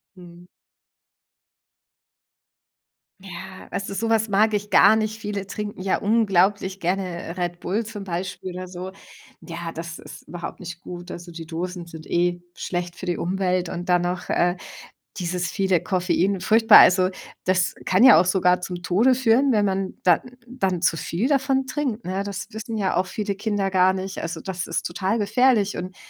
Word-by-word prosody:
Mhm. 175 Hz, -1 st, -14 dB, 2.7 s
Ja, 190 Hz, 0 st, -10 dB
weißt 195 Hz, 0 st, -3 dB
du, 200 Hz, -, -5 dB
so 225 Hz, +3 st, -1 dB
was 220 Hz, 0 st, +2 dB
mag 215 Hz, +2 st, +3 dB
ich 205 Hz, 0 st, -2 dB
gar 220 Hz, -, +6 dB
nicht. 215 Hz, 0 st, -2 dB
Viele 205 Hz, -2 st, -4 dB
trinken 205 Hz, -2 st, -6 dB
ja 190 Hz, -, +1 dB
unglaublich 200 Hz, -2 st, +2 dB
gerne, 180 Hz, -1 st, -2 dB
äh, 165 Hz, -, -6 dB
Red 175 Hz, -1 st, -3 dB
Bull 210 Hz, +5 st, -1 dB
zum 210 Hz, -2 st, -7 dB
Beispiel 185 Hz, 0 st, -5 dB
oder 185 Hz, +1 st, -6 dB
so. 180 Hz, +1 st, -7 dB, 0.5 s
Ja, 170 Hz, -1 st, -6 dB
das 165 Hz, +1 st, -7 dB
ist 150 Hz, -1 st, -12 dB
überhaupt 175 Hz, 0 st, -7 dB
nicht 170 Hz, -1 st, -8 dB
gut. 175 Hz, 0 st, -9 dB
Also 175 Hz, 0 st, -8 dB
die 165 Hz, -1 st, -9 dB
Dosen 175 Hz, +1 st, -5 dB
sind 160 Hz, -1 st, -10 dB
eh 175 Hz, 0 st, 0 dB
schlecht 175 Hz, -1 st, -4 dB
für 185 Hz, -, -8 dB
die 175 Hz, -, 0 dB
Umwelt 185 Hz, 0 st, -1 dB
und 175 Hz, +1 st, -6 dB
dann 180 Hz, -1 st, +3 dB
noch, 180 Hz, +1 st, -3 dB
äh, 175 Hz, +1 st, +2 dB, 0.6 s
dieses 180 Hz, 0 st, -2 dB
viele 190 Hz, -4 st, +1 dB
Koffein, 185 Hz, 0 st, 0 dB
furchtbar. 220 Hz, +2 st, +7 dB
Also, 185 Hz, 0 st, +6 dB, 0.3 s
das 185 Hz, 0 st, +1 dB
kann 185 Hz, +5 st, +3 dB
ja 210 Hz, -11 st, +9 dB
auch -, -, -1 dB
sogar 180 Hz, -1 st, +2 dB
zum 180 Hz, -1 st, -6 dB
Tode 225 Hz, +9 st, +3 dB
führen, 260 Hz, +2 st, +3 dB
wenn 210 Hz, -3 st, +3 dB
man, 190 Hz, -1 st, -2 dB
dann 175 Hz, -3 st, +4 dB, 0.3 s
dann 190 Hz, -8 st, -2 dB
zu -, -, +3 dB
viel 185 Hz, +11 st, -2 dB
davon 270 Hz, -1 st, +1 dB
trinkt, 260 Hz, -8 st, -3 dB
ne? 190 Hz, +2 st, -2 dB
Das 200 Hz, 0 st, -5 dB
wissen 220 Hz, +1 st, -5 dB
ja 195 Hz, -4 st, 0 dB
auch 185 Hz, +1 st, +1 dB
viele 205 Hz, 0 st, -3 dB
Kinder 205 Hz, -2 st, -1 dB
gar 185 Hz, 0 st, +4 dB
nicht. 190 Hz, 0 st, -5 dB
Also, 165 Hz, -1 st, -5 dB
das 185 Hz, -1 st, -4 dB
ist 165 Hz, -, -2 dB
total 190 Hz, +5 st, -1 dB
gefährlich 215 Hz, 0 st, +2 dB
und 180 Hz, +1 st, -6 dB
185 Hz, 175 wpm, -23 LUFS, 175-205 Hz, 2.7 s, ja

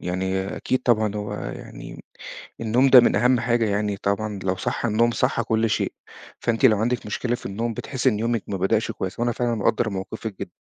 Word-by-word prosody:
يعني 95 Hz, +2 st, -2 dB
أكيد 130 Hz, -, 0 dB
طبعًا، 110 Hz, -3 st, +2 dB
هو 105 Hz, 0 st, -4 dB
يعني -, -, -8 dB, 0.6 s
النوم 120 Hz, +4 st, +3 dB
ده 130 Hz, -1 st, +10 dB
من 120 Hz, -, +2 dB
أهم 125 Hz, +3 st, +3 dB
حاجة 120 Hz, -1 st, +1 dB
يعني 105 Hz, 0 st, -1 dB
طبعًا 100 Hz, +1 st, -2 dB
لو 95 Hz, 0 st, 0 dB
صح 95 Hz, -, -2 dB
النوم 115 Hz, +2 st, +2 dB
صح 115 Hz, -, 0 dB
كل 110 Hz, 0 st, +1 dB
شيء، -, -, 0 dB, 0.5 s
فأنتِ 115 Hz, +2 st, 0 dB
لو 110 Hz, -4 st, +4 dB
عندِك 120 Hz, +2 st, -1 dB
مشكلة 120 Hz, +3 st, -2 dB
في -, -, -6 dB
النوم، 115 Hz, +4 st, -3 dB
بتحسي 130 Hz, +3 st, -1 dB
إن 105 Hz, -5 st, 0 dB
يومِك 115 Hz, -1 st, 0 dB
ما 100 Hz, -, -2 dB
بدأش 105 Hz, +4 st, +1 dB
كويس، 95 Hz, +1 st, -5 dB
وأنا 120 Hz, 0 st, +1 dB
فعلًا 120 Hz, 0 st, -1 dB
مقدر 110 Hz, +1 st, +1 dB
موقفِك 100 Hz, +2 st, -6 dB
جدًا، -, -, -5 dB
110 Hz, 195 wpm, -23 LUFS, 100-120 Hz, 0.6 s, ده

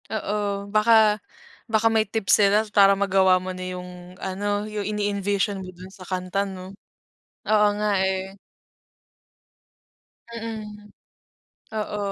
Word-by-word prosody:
Oo, 205 Hz, -2 st, -2 dB
baka 215 Hz, -1 st, +5 dB, 0.5 s
baka 220 Hz, 0 st, +3 dB
may 220 Hz, -1 st, +4 dB
tips 215 Hz, -3 st, +1 dB
sila 205 Hz, +2 st, +4 dB
para 200 Hz, -1 st, +6 dB
magawa 190 Hz, -2 st, +3 dB
mo 185 Hz, 0 st, -5 dB
na 185 Hz, 0 st, -7 dB
yung 180 Hz, 0 st, -11 dB
ano, 205 Hz, +2 st, -2 dB
yung 210 Hz, -1 st, -4 dB
ini-envision 205 Hz, -1 st, -1 dB
mo 185 Hz, -, -8 dB
dun 185 Hz, +1 st, -13 dB
sa 185 Hz, -, -12 dB
kanta 185 Hz, +1 st, -2 dB
'no. 190 Hz, 0 st, -9 dB, 0.7 s
Oo 210 Hz, -1 st, +4 dB
nga, 210 Hz, 0 st, 0 dB
eh. 190 Hz, 0 st, -1 dB, 2.0 s
Mm. 215 Hz, -2 st, -8 dB, 0.8 s
Oo. 210 Hz, -1 st, -3 dB
200 Hz, 120 wpm, -24 LUFS, 190-210 Hz, 2.0 s, para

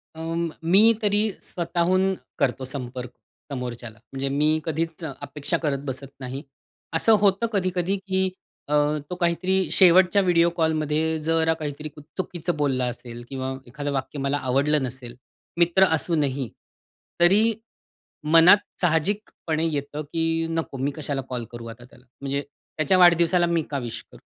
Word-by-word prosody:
अ, 160 Hz, -, -8 dB, 0.4 s
मी 200 Hz, +7 st, +6 dB
तरी 210 Hz, +1 st, +2 dB
स्वतःहून 185 Hz, +2 st, 0 dB, 0.3 s
करतो 135 Hz, -1 st, 0 dB
संपर्क 125 Hz, -2 st, -6 dB, 0.4 s
समोरच्याला. 120 Hz, -4 st, -6 dB
म्हणजे 135 Hz, 0 st, -2 dB
मी 150 Hz, +3 st, +2 dB
कधीच 165 Hz, +1 st, -3 dB
अपेक्षा 145 Hz, +2 st, -3 dB
करत 140 Hz, -3 st, 0 dB
बसत 135 Hz, 0 st, -6 dB
नाही. 130 Hz, +2 st, -6 dB, 0.5 s
असं 220 Hz, +7 st, +4 dB
होतं 200 Hz, +2 st, +3 dB
कधी-कधी 185 Hz, 0 st, 0 dB
की 190 Hz, 0 st, +1 dB, 0.4 s
अ, 150 Hz, -, -2 dB, 0.4 s
तो 180 Hz, -, -3 dB
काहीतरी 185 Hz, +2 st, +1 dB
शेवटच्या 185 Hz, +1 st, +6 dB
व्हिडिओ 170 Hz, -2 st, +4 dB
कॉलमध्ये 160 Hz, 0 st, +1 dB
जरा 160 Hz, 0 st, +2 dB
काहीतरी 150 Hz, -1 st, -5 dB, 0.3 s
चुकीचं 175 Hz, -2 st, -3 dB
बोलला 135 Hz, -4 st, +1 dB
असेल 120 Hz, -1 st, -9 dB
किंवा 130 Hz, -1 st, -4 dB, 0.2 s
एखादं 145 Hz, +3 st, -4 dB
वाक्य 140 Hz, +1 st, -3 dB
मला 140 Hz, +1 st, 0 dB
आवडलं 140 Hz, +2 st, +2 dB
नसेल, 125 Hz, -2 st, -6 dB, 0.4 s
मित्र 175 Hz, +3 st, +5 dB
असूनही, 145 Hz, -6 st, -1 dB, 0.7 s
तरी 210 Hz, +6 st, +5 dB, 0.7 s
मनात 165 Hz, +5 st, +7 dB, 0.2 s
साहजिकपणे 165 Hz, -1 st, 0 dB
येतं, 145 Hz, +1 st, -3 dB
की 165 Hz, +2 st, -1 dB
नको 165 Hz, -4 st, -3 dB
मी 135 Hz, +2 st, -1 dB
कशाला 145 Hz, -3 st, -3 dB
कॉल 125 Hz, -2 st, -3 dB
करू 120 Hz, -1 st, -8 dB
आता 115 Hz, +1 st, -11 dB
त्याला, 125 Hz, 0 st, -20 dB, 0.2 s
म्हणजे 140 Hz, 0 st, -2 dB
त्याच्या 155 Hz, +5 st, -2 dB
वाढदिवसाला 175 Hz, 0 st, +5 dB
मी 170 Hz, -1 st, +1 dB
का 140 Hz, -, -1 dB
विश 120 Hz, -3 st, -6 dB
करू? -, -, -15 dB
155 Hz, 140 wpm, -24 LUFS, 135-175 Hz, 0.7 s, मनात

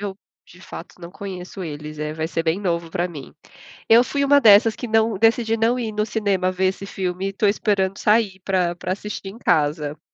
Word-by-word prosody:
eu, 200 Hz, -1 st, -5 dB, 0.3 s
de 180 Hz, -, -18 dB
fato, 185 Hz, -, -11 dB
não 170 Hz, -, -8 dB
conheço 190 Hz, -1 st, -8 dB
eles. 150 Hz, -1 st, -7 dB
Eh, 150 Hz, 0 st, -3 dB
vai 160 Hz, 0 st, -3 dB
ser 165 Hz, 0 st, -2 dB
bem 165 Hz, +4 st, 0 dB
novo 170 Hz, -3 st, -2 dB
pra 175 Hz, +2 st, -1 dB
mim. 150 Hz, -6 st, -10 dB, 0.6 s
Eu 235 Hz, +2 st, +7 dB
fui 280 Hz, -1 st, -1 dB
uma 285 Hz, +1 st, +5 dB
dessas 220 Hz, -1 st, +6 dB
que 245 Hz, -, -7 dB
não 220 Hz, -2 st, +2 dB
decidi 225 Hz, +1 st, +2 dB
não 230 Hz, +3 st, +2 dB
ir 230 Hz, -3 st, -3 dB
no 210 Hz, 0 st, -1 dB
cinema 195 Hz, -4 st, 0 dB
ver 185 Hz, +1 st, +1 dB
esse 190 Hz, +1 st, -3 dB
filme, 185 Hz, -1 st, -4 dB
e 195 Hz, -, 0 dB
estou 200 Hz, +1 st, +1 dB
esperando 195 Hz, -2 st, 0 dB
sair 210 Hz, -3 st, +2 dB
pra 185 Hz, -2 st, 0 dB
pra 180 Hz, +1 st, -3 dB
assistir 205 Hz, -1 st, -7 dB
em 195 Hz, -, -9 dB
casa. 150 Hz, -6 st, 0 dB
195 Hz, 215 wpm, -22 LUFS, 175-215 Hz, 0.6 s, Eu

